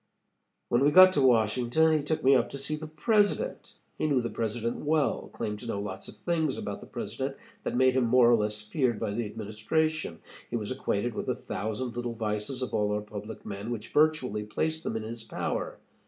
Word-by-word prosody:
"When 120 +2 +3
we 145 - +6
got 185 +4 +8
to 145 - +3
Washington, 125 +6 +3
he 155 - +1
took 155 +2 -1
me 135 +1 +6
up 130 - +3
to - - -5
see 140 +3 0
the 155 +1 -7
President. 205 - +1 0.3
He - - +1
knew 140 -4 +3
the 120 -1 -3
President 115 +1 -2
well 150 -1 0
claimed 105 0 -4
to 120 - -7
know 100 - -2
lots 100 -2 -5
of - - -9
things 160 +8 0
about - - -5
the - - -11
President - - -4 0.2
that - - -3
made 130 0 +5
him 130 -1 +2
more 120 +1 +5
or - - +7
less 105 -1 -1
feared 120 -1 0
by 110 -3 -2
the 110 +1 -2
administration. 110 - -2 0.3
He - - -3
was 110 -1 -2
acquainted 120 -3 -1
with - - -4
a 125 - +1
thousand 110 +1 -4
little 120 -1 -3
vices 110 +4 -2
of - - -5
all 105 -1 +1
our 105 0 0
public 105 +1 -8
men, 100 +2 -5
which 115 -3 -5
virtually 150 -8 +2
placed 160 +9 -2
them - - -3
in 110 - -4
his 115 +1 -6
power. 110 - -3
120 Hz, 215 wpm, -28 LUFS, 105-150 Hz, 0.3 s, got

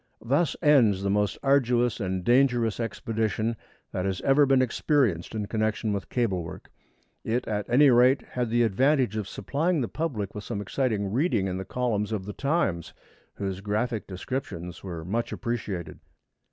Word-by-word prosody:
Thus 140 +7 +2
ends 115 -11 +4
the 100 - +1
most 105 0 +1
arduous 125 -4 +2
and 95 -3 -2
dangerous 120 -2 +3
expedition 115 0 -1 0.4
that 90 - -2
had 95 -1 -1
ever 140 +1 +4
been 135 -1 +4
experienced 125 - +1
in 105 -1 -2
connection 110 0 -1
with 100 - -4
cable 110 -8 0
work. 80 - -10 0.5
It, 120 +3 -1
at 105 -2 -2
any 135 +3 +6
rate, 125 +3 +5
had 125 -2 -1
the 120 +1 +3
advantage 125 +1 +2
of 105 -3 -3
supplying 160 +2 -1
the 120 - -1
public 125 -11 -3
with 105 - -6
some 105 -1 -4
exciting 105 -1 -1
reading 125 - +1
in 95 -1 -2
the 95 - -5
columns 110 -2 -1
of 100 -4 -3
The 105 - -6
Times, 135 - -1 0.4
whose 95 -1 -4
graphic 110 +3 -2
descriptions 90 -4 -5
were 85 -4 -6
much 115 +6 -2
appreciated. 105 -7 -4
115 Hz, 165 wpm, -27 LUFS, 100-130 Hz, 0.5 s, any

